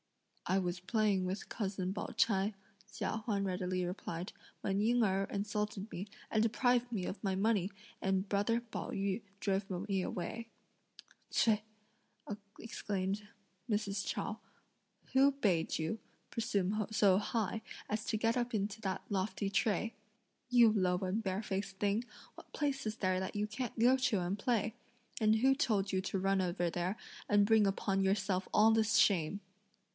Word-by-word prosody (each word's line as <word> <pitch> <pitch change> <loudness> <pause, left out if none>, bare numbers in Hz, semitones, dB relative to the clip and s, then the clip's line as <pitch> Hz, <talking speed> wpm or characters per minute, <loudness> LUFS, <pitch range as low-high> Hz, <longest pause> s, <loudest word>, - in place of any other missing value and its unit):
"I 190 - +3
was 180 -1 -1
playing 205 -1 +2
with 190 +2 -3
cousin 190 -3 -2
Pao - - -3
ch'ai," 200 -1 +1 0.4
Chia - - -2
Huan 200 -3 0
readily 185 -1 -1
replied, 175 0 -5 0.3
"when 195 +1 0
Ying 240 +3 +3
Erh 195 -1 +2
insulted 210 0 -2
me, 190 +4 -5 0.2
and 220 -1 +3
deprived 245 +2 +2
me 195 -6 -2
of 200 - -5
my 195 -2 +1
money, 200 -1 +2 0.3
and 190 0 +1
brother 205 +4 +2
Pao 235 -2 -6
yü 195 +2 -1 0.2
drove 195 -1 0 0.2
me 195 -2 +1
away." 220 +6 -4 0.8
"Ts'ui!" 220 -2 +3 1.0
exclaimed 205 -2 -3 0.4
Mrs. 205 -2 0
Chao, - - -3 0.7
"who 270 +2 +6
bade 190 -12 +1
you 160 +7 -2 0.3
(presume 215 -3 0
so 200 -3 +5
high) 220 0 -1 0.3
as 215 +1 -1
to 215 - 0
get 225 +2 +2
up 245 0 -1
into 210 +1 -2
that 190 -2 -2
lofty 200 +1 -1
tray? 215 +2 +1 0.6
You 240 -3 +6
low 185 -3 +2
and 190 +4 -1
barefaced 195 0 -2
thing! 205 +3 +1 0.3
What - - -14
place 275 -4 -1
is 215 +1 -3
there 185 -1 +1
that 190 +2 -4
you 205 0 +1
can't 220 +3 -4
go 245 +3 +6
to 250 -6 +1
and 180 +3 -1
play; 220 0 0 0.5
and 215 0 +5
who 265 +4 +5
told 210 -8 +1
you 190 - +2
to 195 0 -2
run 195 0 +2
over 175 -1 0
there 180 +5 -1 0.3
and 205 0 +5
bring 215 -1 +5
upon 195 0 +1
yourself 190 -1 +1
all 215 +1 +6
this 220 0 +3
shame?" 195 -3 +3
205 Hz, 155 wpm, -34 LUFS, 190-220 Hz, 1.0 s, who